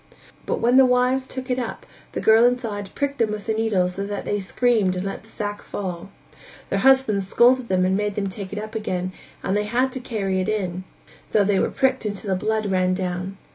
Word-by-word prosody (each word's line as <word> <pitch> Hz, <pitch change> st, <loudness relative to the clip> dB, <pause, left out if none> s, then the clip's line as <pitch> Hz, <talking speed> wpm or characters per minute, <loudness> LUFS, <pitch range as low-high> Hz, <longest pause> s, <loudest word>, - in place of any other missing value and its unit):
But -, -, 0 dB
when 240 Hz, +2 st, +4 dB
the 265 Hz, -, +8 dB
wives 250 Hz, +1 st, +2 dB
took 260 Hz, 0 st, -5 dB
it 250 Hz, -, +1 dB
up, 240 Hz, -3 st, -5 dB, 0.3 s
the -, -, -2 dB
girl 220 Hz, +1 st, +6 dB
inside 230 Hz, -5 st, 0 dB
pricked 280 Hz, 0 st, -2 dB
them 225 Hz, -2 st, +2 dB
with 210 Hz, -1 st, -5 dB
the 220 Hz, -, 0 dB
needles 205 Hz, -5 st, +1 dB
so 195 Hz, -, -3 dB
that 205 Hz, 0 st, -4 dB
they 205 Hz, -, -1 dB
screamed 205 Hz, -1 st, +1 dB
and 180 Hz, +1 st, -3 dB
let 195 Hz, -, -4 dB
the 220 Hz, -, -20 dB
sack 205 Hz, -1 st, -4 dB
fall. 185 Hz, -2 st, -5 dB, 0.6 s
Their 195 Hz, -, +1 dB
husbands 225 Hz, -6 st, +4 dB
scolded 245 Hz, +4 st, +4 dB
them 185 Hz, -2 st, +2 dB
and 190 Hz, +1 st, +2 dB
made 205 Hz, 0 st, -1 dB
them 200 Hz, -1 st, -1 dB
take 190 Hz, 0 st, -6 dB
it 205 Hz, -, -5 dB
up 215 Hz, +1 st, -5 dB
again, 185 Hz, -4 st, -3 dB, 0.3 s
and 190 Hz, -, 0 dB
they 210 Hz, 0 st, +1 dB
had 250 Hz, +5 st, +1 dB
to 260 Hz, -, -4 dB
carry 200 Hz, -6 st, -1 dB
it 185 Hz, -, -2 dB
in, 185 Hz, -4 st, -2 dB, 0.5 s
though 210 Hz, -, +5 dB
they 195 Hz, -1 st, +2 dB
were -, -, +1 dB
pricked 265 Hz, 0 st, +1 dB
till 210 Hz, -2 st, -2 dB
the 195 Hz, -1 st, -2 dB
blood 215 Hz, +3 st, -1 dB
ran 185 Hz, 0 st, +2 dB
down. 185 Hz, +1 st, -3 dB
210 Hz, 225 wpm, -23 LUFS, 190-240 Hz, 0.6 s, the